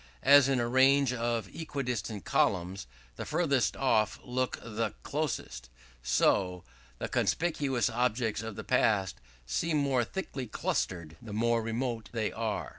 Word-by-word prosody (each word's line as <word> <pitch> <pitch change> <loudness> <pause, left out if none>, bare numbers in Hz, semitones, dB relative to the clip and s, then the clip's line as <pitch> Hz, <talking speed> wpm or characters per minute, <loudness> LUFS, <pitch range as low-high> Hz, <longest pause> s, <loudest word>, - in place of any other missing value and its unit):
As 140 0 +7
in 135 -2 +2
a 120 - 0
range 130 +1 +4
of 115 -3 -1
equidistant 125 - -4
columns, 90 -4 0 0.3
the - - -4
furthest 150 -6 +1
off 110 -5 +2
look 130 +1 -1
the 115 0 -3
closest; 140 - -3 0.3
so, 90 +8 +2 0.3
the - - -3
conspicuous 145 -7 0
objects 115 -2 0
of 110 -2 -6
the - - -6
past 100 - +1 0.2
seem 155 - 0
more 135 -4 +2
thickly 135 -3 -5
clustered 85 -6 -2
the 110 -3 -8
more 115 +2 +2
remote 115 0 -3
they 110 -3 -1
are." 110 -3 -3
120 Hz, 135 wpm, -30 LUFS, 105-135 Hz, 0.3 s, As